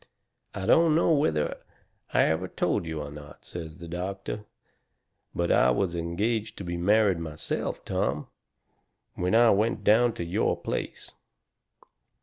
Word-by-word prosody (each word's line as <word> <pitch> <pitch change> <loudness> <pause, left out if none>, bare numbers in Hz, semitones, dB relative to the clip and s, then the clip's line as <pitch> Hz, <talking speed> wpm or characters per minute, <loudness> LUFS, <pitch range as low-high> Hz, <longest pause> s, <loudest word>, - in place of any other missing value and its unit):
"I 95 - -4
don't 165 +4 +5
know 165 - +3
whether 80 - +1 0.5
I - - +4
ever 80 +3 0
told 85 - -1
you 80 -2 -3
or 70 - -8
not," 75 0 -12
says 80 -2 -7
the 85 - -9
doctor, 95 +4 -5 0.9
"but 85 0 0
I 65 - +5
was 85 +7 +1
engaged 105 +7 -2
to - - -6
be 85 -1 -4
married 100 +1 +3
myself, 80 -2 -4
Tom, 70 +3 -1 0.9
when 90 +4 0
I 115 0 +6
went 105 +1 +1
down 115 +3 +4
to 85 - -5
your 85 - 0
place. - - -5
90 Hz, 140 wpm, -27 LUFS, 80-110 Hz, 0.9 s, I